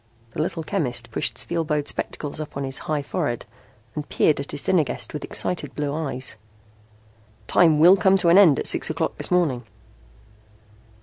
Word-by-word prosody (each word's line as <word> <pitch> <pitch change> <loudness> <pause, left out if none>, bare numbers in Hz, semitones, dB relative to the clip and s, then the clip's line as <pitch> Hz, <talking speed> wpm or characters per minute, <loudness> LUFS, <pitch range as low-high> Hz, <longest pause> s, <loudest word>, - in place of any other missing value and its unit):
The 150 - -3
little 165 0 -3
chemist 125 - -2
pushed 115 0 -1
steel 170 +5 0
bowed 150 -2 -2
spectacles 145 0 -3
up 150 - -7
on 140 - -3
his 135 -1 -1
high 150 -2 0
forehead 120 -3 -3 0.5
and 150 +2 -6
peered 150 - +2
at 140 - -6
his - - -5
dinner 180 -4 +3
guest - - -5
with 150 - -5
excited 180 - -2
blue 145 -1 -2
eyes. 135 -6 -2 1.1
"Time 160 -4 +4
will 175 +5 +7
come 195 -1 +3
to 175 -2 +2
an 170 - +6
end 165 -9 +6
at - - -3
six - - +1
o'clock - - -2
this - - -1
morning." 160 -9 +1
150 Hz, 180 wpm, -23 LUFS, 140-170 Hz, 1.1 s, will